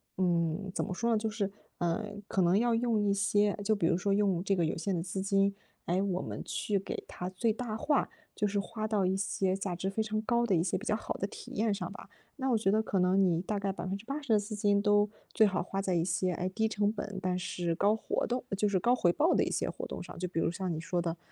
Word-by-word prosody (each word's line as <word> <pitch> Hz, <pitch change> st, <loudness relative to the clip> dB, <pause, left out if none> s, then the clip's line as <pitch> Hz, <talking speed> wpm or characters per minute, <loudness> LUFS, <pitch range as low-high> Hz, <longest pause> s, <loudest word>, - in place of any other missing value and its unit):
嗯， 175 Hz, +1 st, 0 dB
怎 -, -, -1 dB
么 -, -, -3 dB
说 235 Hz, +6 st, 0 dB
呢， 225 Hz, -, +4 dB
就 220 Hz, +1 st, -1 dB
是， 210 Hz, -2 st, -2 dB, 0.3 s
呃， 175 Hz, +5 st, -1 dB
可 195 Hz, -, +1 dB
能 175 Hz, +2 st, +4 dB
要 235 Hz, +2 st, +3 dB
用 230 Hz, -2 st, +2 dB
一 -, -, +3 dB
些 205 Hz, +1 st, +2 dB
就 215 Hz, +1 st, +3 dB
比 200 Hz, -, 0 dB
如 170 Hz, 0 st, +3 dB
说， 195 Hz, +2 st, +1 dB
用 195 Hz, -4 st, +2 dB
这 195 Hz, 0 st, +2 dB
个 175 Hz, -, +1 dB
有 155 Hz, -, -1 dB
限 185 Hz, +3 st, -1 dB
的 165 Hz, -, -1 dB
资 190 Hz, +1 st, -3 dB
金， 195 Hz, 0 st, +2 dB, 0.3 s
诶， 180 Hz, +2 st, +2 dB
我 190 Hz, -2 st, 0 dB
们 -, -, -5 dB
去 205 Hz, -2 st, -1 dB
给 195 Hz, -, -5 dB
它 180 Hz, -, -5 dB
最 220 Hz, +5 st, +1 dB
大 230 Hz, -1 st, -4 dB
化， 290 Hz, +5 st, +1 dB, 0.3 s
就 210 Hz, -, +1 dB
是 205 Hz, 0 st, 0 dB
花 215 Hz, +2 st, -4 dB
到 210 Hz, -3 st, +1 dB
一 185 Hz, +1 st, +2 dB
些 190 Hz, -1 st, 0 dB
价 195 Hz, -2 st, -3 dB
值 185 Hz, +2 st, -2 dB
非 195 Hz, +3 st, -1 dB
常 215 Hz, 0 st, -1 dB
高 235 Hz, +2 st, +2 dB
的 200 Hz, -5 st, +2 dB
一 165 Hz, -, +2 dB
些 180 Hz, -, 0 dB
比 205 Hz, -, -8 dB
较 215 Hz, -, +2 dB
好 220 Hz, -, -3 dB
的 195 Hz, -, -2 dB
体 -, -, -10 dB
验 215 Hz, 0 st, +2 dB
上 200 Hz, -, -4 dB
吧。 -, -, -11 dB, 0.3 s
那 265 Hz, -1 st, -1 dB
我 235 Hz, -, +4 dB
觉 205 Hz, -3 st, +2 dB
得 215 Hz, +2 st, +3 dB
可 200 Hz, -3 st, -1 dB
能 180 Hz, +2 st, +4 dB
你 175 Hz, -3 st, +3 dB
大 205 Hz, +2 st, -2 dB
概 200 Hz, 0 st, -1 dB
80% 225 Hz, +9 st, -4 dB
的 215 Hz, -, +6 dB
资 210 Hz, +1 st, -5 dB
金 205 Hz, -1 st, +3 dB
都 205 Hz, 0 st, +4 dB, 0.2 s
最 220 Hz, -, +6 dB
好 195 Hz, -1 st, 0 dB
花 195 Hz, +2 st, -3 dB
在 190 Hz, -2 st, 0 dB
一 165 Hz, -, +2 dB
些， 185 Hz, +1 st, 0 dB
诶， 180 Hz, +2 st, -2 dB
低 220 Hz, +4 st, 0 dB
成 210 Hz, -1 st, +1 dB
本， 205 Hz, -2 st, -5 dB
但 180 Hz, -1 st, 0 dB
是 175 Hz, -1 st, -2 dB
高 200 Hz, +5 st, +3 dB
活 220 Hz, -, -1 dB
动 250 Hz, +1 st, -1 dB, 0.2 s
就 210 Hz, -, +2 dB
是 200 Hz, -2 st, +2 dB
高 240 Hz, +7 st, +3 dB
回 175 Hz, -8 st, +3 dB
报 310 Hz, -, +3 dB
的 -, -, +3 dB
一 -, -, -2 dB
些 -, -, 0 dB
活 -, -, -5 dB
动 -, -, -6 dB
上。 -, -, -9 dB
就 180 Hz, -, -2 dB
比 170 Hz, -, -2 dB
如， -, -, +2 dB
像 180 Hz, +1 st, -3 dB
你 155 Hz, -, -3 dB
说 175 Hz, +1 st, -1 dB
的， 170 Hz, 0 st, -2 dB
200 Hz, 290 characters per minute, -31 LUFS, 185-215 Hz, 0.3 s, 的